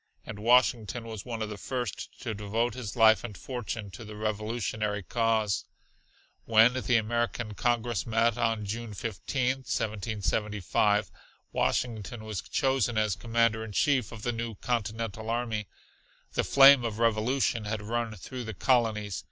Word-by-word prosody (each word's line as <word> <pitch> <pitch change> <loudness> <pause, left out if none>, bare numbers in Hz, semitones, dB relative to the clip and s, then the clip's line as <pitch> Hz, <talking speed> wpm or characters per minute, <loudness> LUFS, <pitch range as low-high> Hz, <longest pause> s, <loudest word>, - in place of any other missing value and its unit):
And 105 - -7
Washington 120 0 +3
was 110 -3 -7
one 115 -3 -3
of 110 - -4
the 105 -1 -7
first 120 -2 -4
to 110 - -3
devote 110 +4 -1
his 125 -5 -6
life 110 -3 +6
and 105 -5 -7
fortune 115 -3 -5
to 95 +6 -9
the 105 -1 -9
Revolutionary 105 -1 -2
cause. 110 -2 +1 0.8
When 115 +2 +6
the 125 -1 +2
American 120 0 -1
Congress 120 -2 0
met 115 0 +2
on 115 -2 0
June 110 +1 -5
15, 125 - -1
1775, 105 -3 0 0.4
Washington 115 -1 -1
was 110 -4 -3
chosen 130 -4 0
as 110 -4 +2
Commander 115 -1 +1
in 110 -2 -8
Chief 130 -2 +2
of 110 -1 -9
the 120 - 0
new 115 -1 -4
continental 110 -1 -3
army. 115 -3 -1 0.7
The - - +1
flame 135 -2 +8
of 110 -3 -3
revolution 115 +1 +1
had 105 0 -3
run 115 0 -2
through 125 +2 -7
the 110 -2 -6
colonies. 110 -6 +1
115 Hz, 145 wpm, -29 LUFS, 105-120 Hz, 0.8 s, flame